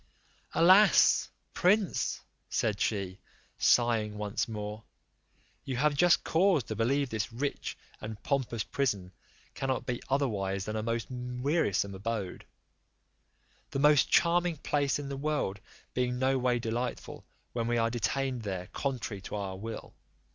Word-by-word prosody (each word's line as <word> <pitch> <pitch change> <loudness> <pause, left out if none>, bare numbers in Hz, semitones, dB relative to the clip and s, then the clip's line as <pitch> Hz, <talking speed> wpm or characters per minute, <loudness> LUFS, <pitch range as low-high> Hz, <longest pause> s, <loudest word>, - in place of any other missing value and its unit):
"Alas! 185 +5 +6 0.2
prince," 195 +1 +2 0.3
said 105 -2 0
she, 100 -3 -1 0.4
sighing 110 -3 +3
once 105 0 -2
more, 105 0 -5 0.8
"you 130 -2 -3
have 150 +3 +3
just 175 +4 +4
cause 175 -4 +3
to 110 - -5
believe 130 +5 +1
this 110 0 -2
rich 140 +5 -3 0.2
and 110 -1 -7
pompous 125 -6 -1
prison 100 -10 -1 0.4
cannot 135 0 -2
be 125 -1 -3
otherwise 100 -8 0
than 110 - -4
a 110 - -1
most 115 +1 -1
wearisome 125 - 0
abode: 100 -1 -4 1.2
the - - -3
most 150 0 +5
charming 175 -1 +3
place 145 -1 0
in 145 -1 -5
the 140 - -4
world 140 -9 -1 0.3
being 125 0 0
no 130 +1 +2
way 125 -1 +2
delightful 120 +1 -4 0.3
when 115 -1 -1
we 120 0 +1
are 115 0 +2
detained 130 +1 -1
there 95 -4 -4
contrary 125 -7 -3
to 95 - -6
our 100 -2 -3
will. 110 +4 -7
120 Hz, 135 wpm, -30 LUFS, 105-140 Hz, 1.2 s, Alas